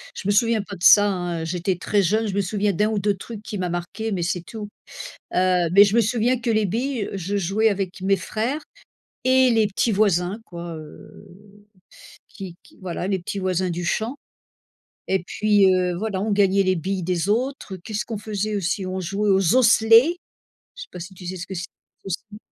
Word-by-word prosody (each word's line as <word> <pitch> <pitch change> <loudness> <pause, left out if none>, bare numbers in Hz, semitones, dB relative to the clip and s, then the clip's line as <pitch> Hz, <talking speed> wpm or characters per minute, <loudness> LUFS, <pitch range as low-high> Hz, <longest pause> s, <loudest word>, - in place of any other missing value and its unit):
je 195 - -6
me 205 - +3
souviens 230 +1 +2
pas 200 0 -8
de 175 - -11
ça 205 +1 +8
hein, 175 -3 -3
j'étais 180 +3 -1
très 205 +3 +1
jeune, 215 +5 +1
je 200 - -3
me 200 - 0
souviens 200 +1 0
d'1 210 +4 +1
ou 215 - -1
2 200 +1 +1
trucs 215 +1 -9
qui 210 - -6
m'a 180 -1 -2
marqué 175 +6 -4
mais 180 -3 -1
c'est 180 +1 -1
tout. 210 +3 -8 0.6
Heu, 180 -2 +2
mais 200 +2 +8
je 205 +1 +1
me 235 - +5
souviens 240 +3 +1
que 240 0 -3
les 215 -1 +2
billes, 235 +2 -2
je 195 +1 -3
jouais 200 +4 +2
avec 190 -2 -3
mes 195 +1 +3
frères 235 +10 -3 0.6
et 260 0 +4
les 225 -2 +3
petits 210 +3 0
voisins 195 -1 +1
quoi, 170 -1 -7
heu, 155 +6 -13 1.0
qui 190 -4 -9
qui - - -21
voilà, 180 0 -4
les 195 -2 0
petits 195 +3 -5
voisins 185 -1 -1
du 175 +1 -3
champ, 220 +8 -1 0.9
et 190 -2 0
puis, 205 0 +3
heu, 180 -1 +1
voilà, 200 -1 -3
on 215 +1 -1
gagnait 200 -1 +3
les 185 0 +2
billes 185 +2 -3
des 180 +2 -1
autres. 240 -3 -2
Qu'est-ce 210 +4 -5
qu'on 225 - -5
faisait 210 0 -3
aussi? 195 0 -1
On 185 0 -3
jouait 200 +3 -1
aux 190 +1 +3
osselets! 235 +5 +5 0.6
Je - - -10
sais - - -15
pas - - -8
si 180 +3 -9
tu 180 -1 -12
sais 185 +1 -5
ce 180 - -7
que 190 - -6
c'est 180 +1 -4 0.4
les - - -8
osselets? 215 +2 -6
200 Hz, 210 wpm, -23 LUFS, 185-215 Hz, 1.0 s, ça